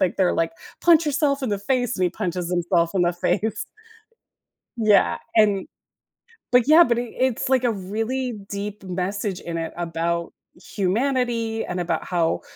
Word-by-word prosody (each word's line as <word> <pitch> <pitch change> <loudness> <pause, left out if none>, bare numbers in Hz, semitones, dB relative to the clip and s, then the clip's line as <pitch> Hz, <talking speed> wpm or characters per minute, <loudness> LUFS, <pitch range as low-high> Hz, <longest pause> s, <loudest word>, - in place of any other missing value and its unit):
like, 185 -3 +1
they're 185 -2 +3
like, 165 0 0 0.3
"Punch 335 -1 +5
yourself 285 -1 +1
in 260 - -1
the 205 - 0
face," 245 +3 0
and 185 - +1
he 180 - +1
punches 180 -2 -3
himself 175 -1 +1
in 185 - +2
the 175 0 +2
face. 210 +5 -1 1.1
Yeah, 205 - +3 0.2
and 205 -3 +3 0.9
but 250 -1 +4
yeah 315 +3 +8
but 235 -5 +1
it 240 -1 -4
it's 260 0 0
like 260 -1 +3
a 245 - +2
really 225 +6 -3 0.2
deep 205 +1 -5
message 190 +1 -3
in 170 -1 -5
it 165 -1 -4
about 170 0 -2 0.4
humanity 230 +2 0
and 180 0 -4
about 170 -2 -1
how 170 -2 0
205 Hz, 160 wpm, -23 LUFS, 175-245 Hz, 1.1 s, yeah